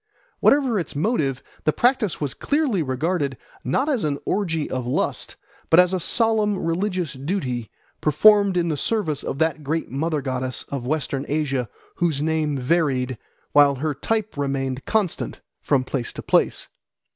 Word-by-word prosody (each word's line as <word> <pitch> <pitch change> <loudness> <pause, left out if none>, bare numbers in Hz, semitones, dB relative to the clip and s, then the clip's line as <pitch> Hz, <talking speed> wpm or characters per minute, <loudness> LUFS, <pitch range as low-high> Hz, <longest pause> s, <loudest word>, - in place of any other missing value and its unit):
Whatever 265 -7 +4
its 170 - -5
motive, 145 - 0 0.2
the 155 - +3
practice 240 - +1
was 145 -3 -2
clearly 285 - 0
regarded, 145 0 -1 0.3
not 260 - 0
as 270 -8 0
an 145 -2 0
orgy 165 -6 0
of 130 -2 -3
lust, 125 - -2 0.3
but 165 - +7
as 180 +1 +5
a 185 - +1
solemn 215 +2 +2
religious 180 0 -1
duty 130 - -3 0.3
performed 200 +4 +5
in 170 -1 +1
the 155 - -1
service 170 -6 -1
of - - -4
that 160 0 0
great 160 +1 -2
Mother 150 +2 -1
Goddess 130 -1 -2
of 130 -3 -4
Western 140 -2 -1
Asia 140 -5 -1 0.3
whose 165 -5 +1
name 155 -1 0
varied, 130 -3 0 0.3
while 145 -1 +6
her 150 +3 -1
type 220 +9 -2
remained 135 -2 -2
constant, 210 -6 -1 0.2
from 135 -3 +2
place 130 -2 -3
to - - -7
place. - - +1
155 Hz, 155 wpm, -23 LUFS, 135-190 Hz, 0.3 s, but